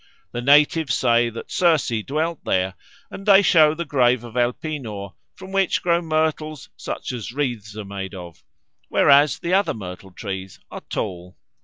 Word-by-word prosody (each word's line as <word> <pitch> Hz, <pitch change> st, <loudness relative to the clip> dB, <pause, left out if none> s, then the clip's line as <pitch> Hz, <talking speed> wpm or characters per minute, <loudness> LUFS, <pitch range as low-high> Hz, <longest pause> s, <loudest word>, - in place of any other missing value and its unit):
The 120 Hz, -, -4 dB
natives 145 Hz, +1 st, +4 dB
say 120 Hz, -1 st, +3 dB
that 115 Hz, 0 st, -9 dB
Circe 165 Hz, -7 st, +2 dB, 0.2 s
dwelt 160 Hz, +3 st, -2 dB
there, 95 Hz, 0 st, 0 dB, 0.4 s
and 195 Hz, -, -8 dB
they 200 Hz, -1 st, +6 dB
show 155 Hz, -4 st, +5 dB
the 170 Hz, +1 st, -4 dB
grave 125 Hz, -4 st, +2 dB
of 120 Hz, -2 st, -10 dB
Elpenor, 120 Hz, -, -3 dB, 0.2 s
from 190 Hz, 0 st, -11 dB
which 195 Hz, -1 st, +1 dB
grow 170 Hz, -1 st, +2 dB
myrtles 155 Hz, -2 st, -2 dB
such -, -, -5 dB
as 120 Hz, -3 st, -6 dB
wreaths 120 Hz, -6 st, -3 dB
are 105 Hz, -, -6 dB
made 95 Hz, 0 st, -6 dB
of, 85 Hz, -3 st, -11 dB, 0.5 s
whereas 145 Hz, +1 st, +5 dB
the 175 Hz, +1 st, -3 dB
other 200 Hz, +1 st, +2 dB
myrtle 95 Hz, -2 st, -8 dB
trees 95 Hz, 0 st, -7 dB
are -, -, -7 dB
tall." 90 Hz, +1 st, -5 dB
130 Hz, 160 wpm, -22 LUFS, 105-160 Hz, 0.5 s, they